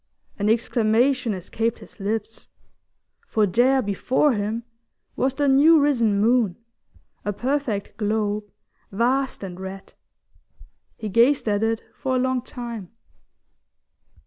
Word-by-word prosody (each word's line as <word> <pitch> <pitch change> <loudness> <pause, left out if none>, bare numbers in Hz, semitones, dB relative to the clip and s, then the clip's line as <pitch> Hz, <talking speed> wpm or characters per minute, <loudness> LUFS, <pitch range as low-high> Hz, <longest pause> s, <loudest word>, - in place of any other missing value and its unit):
An 205 +1 +1
exclamation 235 +2 +2
escaped 225 +5 -2
his - - -16
lips, 215 +2 -4 0.8
for 215 -1 +2
there 250 +7 +3
before 250 +8 +1
him 215 +2 -2 0.5
was 265 +1 0
the 290 0 +1
new 295 +4 +6
risen 235 -8 +2
moon, 225 -4 +2 0.7
a 205 - -1
perfect 245 -2 -2
globe, 210 -1 -1 0.5
vast 250 +4 0
and 185 -2 -7
red. 190 +1 -8 1.0
He 215 - -5
gazed 235 +6 +3
at 205 -1 +1
it 225 0 0
for 260 -1 -2
a - - +2
long 260 0 0
time. 235 -6 -7
225 Hz, 120 wpm, -23 LUFS, 205-260 Hz, 1.0 s, new